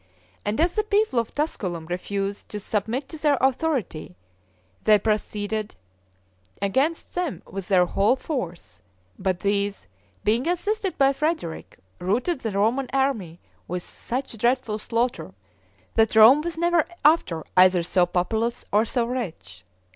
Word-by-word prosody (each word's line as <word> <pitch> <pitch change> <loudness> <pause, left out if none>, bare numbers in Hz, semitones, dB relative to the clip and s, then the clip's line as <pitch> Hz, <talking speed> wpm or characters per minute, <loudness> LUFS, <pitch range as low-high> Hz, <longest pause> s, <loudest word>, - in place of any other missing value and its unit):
And 205 +5 -2
as 340 +2 +3
the 430 - +1
people 420 - +2
of 230 - -3
Tusculum 185 - -2
refused 195 +3 -4
to 210 - -5
submit 220 +6 -2
to 320 - -8
their 295 -2 +3
authority, 260 - -1 0.7
they 215 -1 +6
proceeded 210 0 -2 0.8
against 265 +12 0
them 355 -5 -3
with 195 -1 -7
their 185 -2 +4
whole 200 +7 +2
force; 175 - -5 0.4
but 185 -2 -1
these, 200 - -1 0.4
being 230 +7 +1
assisted 390 +3 -1
by 275 0 +4
Frederick, 300 - -3 0.2
routed 240 - 0
the 225 - -3
Roman 230 +7 +1
army 225 -12 -1 0.3
with 180 0 -4
such 250 -2 -5
dreadful 235 -2 +1
slaughter, 230 - -2 0.6
that 225 -1 +2
Rome 230 +7 +8
was 340 +1 -4
never 340 -1 +3 0.2
after 240 - +3
either 185 -1 +6
so 175 +1 +2
populous 220 +7 -1
or 210 +2 +4
so 235 +1 0
rich. 160 - -5
220 Hz, 135 wpm, -24 LUFS, 195-275 Hz, 0.8 s, Rome